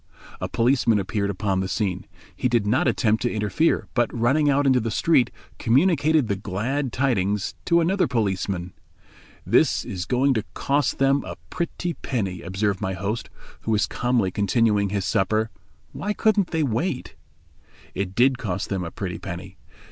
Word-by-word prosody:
A - - -3
policeman 120 -2 +2
appeared 100 +1 -1
upon 100 -1 -1
the 95 - -1
scene. 95 -1 -2 0.3
He 125 - 0
did 120 -4 +2
not 130 +12 +2
attempt 110 -3 +2
to 120 - 0
interfere, 110 +10 +1
but 120 -3 +1
running 135 +6 +2
out 140 0 +2
into 130 -2 +4
the 115 -1 -2
street 130 +2 +3 0.3
communicated 150 +1 +3
the 100 - 0
glad 115 +8 -2
tidings 105 -7 0
to 170 -1 +4
another 185 +3 +2
policeman. 95 -6 -1 0.7
"This - - +3
is 95 -1 -4
going 135 +2 +3
to 110 -4 -1
cost 145 +1 0
them 135 +1 +3
a - - -6 0.2
pretty 175 0 -3
penny," 100 - -3
observed 95 +1 -1
my 95 -2 -1
host, 100 +5 -3 0.3
who - - -7
was 110 -2 +3
calmly 120 -6 0
continuing 105 0 +2
his 100 -1 -2
supper; 110 +4 +1 0.4
"why 210 +1 -3
couldn't 210 -4 +2
they 160 -2 0
wait?" 125 - -2 0.8
It 95 0 -3
did 130 +2 +3
cost 95 -5 -3
them 95 -2 -2
a 85 - -4
pretty 90 -1 -5
penny. 95 0 -8
110 Hz, 165 wpm, -24 LUFS, 100-135 Hz, 0.8 s, into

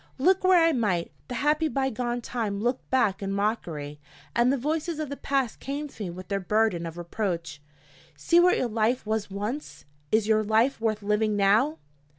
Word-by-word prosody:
Look 370 +8 +3
where 370 -1 +6
I 330 0 +4
might, 205 - 0 0.2
the 250 - -5
happy 300 +5 +2
by 270 -2 -1
gone 240 +1 -2
time 220 -4 -3
looked 245 +4 -2
back 235 -8 +2
in 195 0 -3
mockery, 170 -8 -2 0.4
and 240 +2 +4
the 275 - +1
voices 310 +4 -2
of 310 -3 -3
the 280 - -4
past 275 -4 -1
came 285 +3 -4
to 225 -6 -8
me - - -4
with 180 +1 -9
their 200 0 -1
burden 195 -3 +1
of 165 +1 -8
reproach: 170 -4 -3 0.6
See 335 - +4
what 360 +1 +5
your 250 - 0
life 230 +2 0
was 215 -1 -1
once! 210 +9 -5 0.3
Is 215 -1 +2
your 215 -1 +3
life 225 +4 +2
worth 215 -2 -1
living 210 +1 +1
now? 195 -5 +3
220 Hz, 190 wpm, -26 LUFS, 200-270 Hz, 0.6 s, where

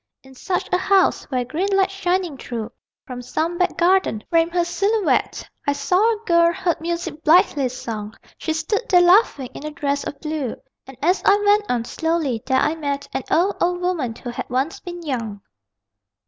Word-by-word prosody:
In 265 0 -16
such 360 +8 -2
a 360 - +3
house, 385 0 +2
where 250 -2 -2
green 330 +11 -2
light 385 0 +2
shining 365 -4 -1
through 235 -3 -6 0.3
(From 250 -1 -7
some 325 +7 -2
back 365 - +1
garden) 350 - +2
framed 330 0 +3
her 345 -1 +2
silhouette 395 +4 0 0.2
I 285 - +3
saw 285 +6 0 0.2
a 435 +1 -15
girl, 340 0 +4
heard 340 -1 -1
music 335 -2 -4
blithely 310 -5 +4
sung. 220 -4 -6 0.2
She 320 - -2
stood 320 +8 -1
there 360 -2 +6
laughing, 350 - +4
in - - -9
a 305 - -3
dress 285 -1 -2
of 280 - -6
blue, 305 -6 -3 0.3
And 265 -2 -12
as 360 +4 +2
I 405 0 +5
went 415 0 +3
on, 240 -2 0
slowly, 320 -6 -1
there 260 - +2
I 305 - +2
met 285 -3 -3
An - - -3
old, 370 +5 +2
old 355 0 +1
woman, 335 -11 -1
who 245 - -7
had - - -6
once 265 +6 -1
been 350 -1 -8
young. 230 -9 -4
320 Hz, 190 wpm, -21 LUFS, 265-360 Hz, 0.3 s, there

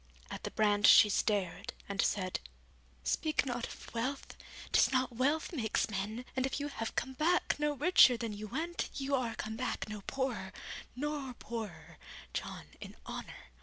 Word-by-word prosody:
At - - -6
the - - -1
brand 205 -1 +3
she 210 - +9
stared, 200 +1 0
and 200 -1 0
said, 185 -2 0 0.6
'Speak 310 -3 +1
not 245 -2 -2
of - - -11
wealth; 255 +4 -3 0.4
'tis - - +5
not 255 -2 +1
wealth 290 +8 +1
makes 225 -5 0
men, 210 +5 -3
and 260 - +1
if 270 - -3
you 290 +1 -2
have 225 -5 -4
come 265 +2 -1
back 320 +4 +2
no 295 0 +2
richer 290 -4 +6
than 230 -2 -3
you 210 +1 -6
went, 325 +9 -2
you 275 0 -2
are 250 -4 +1
come 220 0 -4
back 255 -3 -2
no 210 -1 -6
poorer, 255 -8 -2 0.4
nor 280 -2 -3
poorer, 170 -11 -7 0.3
John, - - -4
in - - -9
honour. - - -8
245 Hz, 165 wpm, -33 LUFS, 210-275 Hz, 0.6 s, she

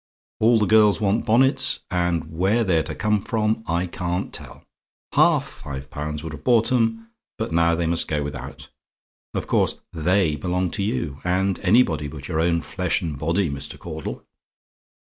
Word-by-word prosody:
"All 115 +2 +5
the 105 - +2
girls 105 -1 +5
want 105 +3 0
bonnets, 130 +3 +3
and 85 -3 -1
where 100 +7 +2
they're 90 -6 +2
to 80 0 -6
come 105 -1 +1
from 110 0 -1
I 85 +2 0
can't 90 +1 -3
tell. - - -8 0.5
Half - - +4
five 65 -2 -8
pounds 75 +1 -4
would 80 -2 -6
have 75 - -9
bought 115 -2 +3
'em 115 -2 0 0.3
but - - -3
now 85 +1 +3
they 85 0 -1
must 85 +1 0
go 75 -1 -1
without. 70 0 -7 0.7
Of - - -2
course, - - +1
THEY 85 -1 +1
belong 90 +3 -1
to 100 - -3
you: 100 - -2
and 95 +1 0
anybody 90 -7 +3
but 70 -2 -8
your 80 -3 -1
own 85 0 +2
flesh 90 +1 -1
and 75 -5 -4
body, 85 +5 +1
Mr. 70 +1 -5
Caudle! 80 -3 -6
90 Hz, 170 wpm, -23 LUFS, 80-105 Hz, 0.7 s, All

